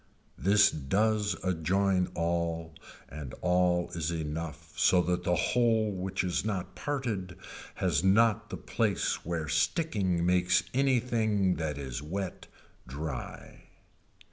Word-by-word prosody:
This 105 +2 +5
does 105 +7 +1
adjoin 95 +2 +1
all 85 -1 -1 0.3
and 70 -4 -8
all 90 -1 +2
is 85 -2 -2
enough 80 -1 -5
so 90 +2 +4
that 90 0 -1
the 90 0 +2
whole 115 0 +2
which 95 0 -2
is 90 -2 -1
not 100 -4 -3
parted 115 -11 -3 0.4
has 85 -5 +1
not 105 +2 +3
the - - -5
place 110 -5 -1
where 80 -2 -3
sticking 85 - 0
makes 90 +1 +3
anything 115 -7 +2
that 75 -3 -3
is 65 -2 -5
wet 95 +5 -5 0.4
dry. 70 0 -7
90 Hz, 115 wpm, -29 LUFS, 80-105 Hz, 0.4 s, This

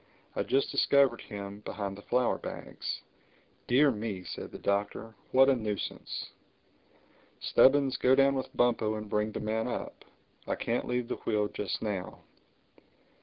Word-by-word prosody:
"I - - 0
just 135 +1 +1
discovered 135 -4 +4
him, 100 -1 -7
behind 100 -2 -4
the 100 - -11
flour 125 +3 +1
bags." - - -5 0.7
"Dear 140 +4 +5
me!" 105 -4 -4
said - - -7
the - - -7
Doctor. 100 +2 -1 0.2
"What 135 +1 +6
a 135 - +5
nuisance! 105 -4 -4 1.1
Stubbins, 135 -1 +4
go 130 +1 +4
down 135 0 +5
with 130 -1 -4
Bumpo 115 -3 +2
and 105 0 -5
bring 105 +1 0
the - - -4
man 110 +2 -1
up. 120 - -5 0.4
I - - 0
can't 120 +1 -1
leave 125 -1 -1
the - - -3
wheel 105 -2 0
just 100 0 -3
now." 100 -4 -4
110 Hz, 150 wpm, -30 LUFS, 105-130 Hz, 1.1 s, What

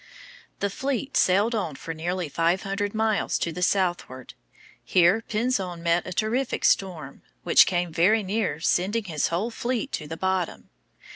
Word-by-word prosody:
The 200 - 0
fleet 275 +4 -3
sailed 200 +6 +3
on 185 -10 -2
for 165 - -6
nearly 175 +2 -3
five 170 +5 0
hundred 200 +1 -3
miles 220 -1 +1
to 170 - -2
the 180 - -6
southward. 175 -9 -1 0.5
Here 180 +5 +3
Pinzon 200 -7 -1
met 170 +1 +1
a - - -5
terrific 225 +7 -1
storm, 160 -8 0 0.2
which - - +6
came 175 -2 -1
very 205 +7 +3
near 195 -4 -1
sending 195 +7 +1
his 160 -6 -1
whole 195 +8 -2
fleet 250 +3 -3
to 150 - -4
the 165 +2 -6
bottom. 185 -1 -2
185 Hz, 155 wpm, -25 LUFS, 170-215 Hz, 0.5 s, which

